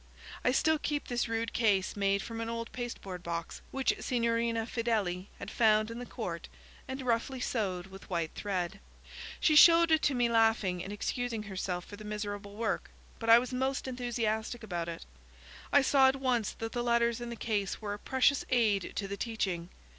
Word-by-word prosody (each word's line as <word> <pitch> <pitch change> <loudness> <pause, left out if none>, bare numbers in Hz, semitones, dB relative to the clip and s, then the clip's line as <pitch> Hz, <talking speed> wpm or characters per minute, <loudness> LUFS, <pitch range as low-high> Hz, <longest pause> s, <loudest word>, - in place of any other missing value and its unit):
I 250 - +3
still 315 +4 +3
keep 295 -1 -2
this 240 -1 0
rude 230 0 -2
case 200 -5 +2
made 200 -1 +1
from 230 0 -5
an 230 - -3
old 230 0 -4
pasteboard 215 -7 -6
box, 170 -1 -5
which 270 -1 +1
Signorina 230 -2 0
Fedeli 210 -6 -1
had - - -7
found 215 -1 +3
in 230 - -6
the 245 - -7
court - - -5 0.4
and 265 0 -5
roughly 250 +2 0
sewed 195 -8 -1
with 190 0 -13
white 170 -3 -1
thread. 190 -2 -3 0.6
She 310 - +4
showed 335 +1 +8
it 315 0 +5
to 280 - +2
me 245 -1 +3
laughing, 225 -6 +2
and 195 - -6
excusing 230 +1 -2
herself 185 -3 -4
for 205 - -10
the 215 - -10
miserable 205 -1 -5
work, 225 +1 -2 0.3
but 230 - -3
I 230 - +10
was 250 +2 -1
most 265 +1 -1
enthusiastic 235 -2 -2
about 175 -5 -3
it. 165 0 -7 0.7
I 285 - +6
saw 270 -1 +5
at 265 - +3
once 250 -5 0
that 225 0 -5
the 240 - -2
letters 235 0 +2
in 240 - -5
the 235 - -5
case 210 -4 -2
were 205 -2 -4
a 205 - -7
precious 265 +3 +2
aid 215 -7 +2
to 200 - -2
the 200 0 -5
teaching. 190 -7 -2
225 Hz, 190 wpm, -31 LUFS, 200-245 Hz, 0.7 s, I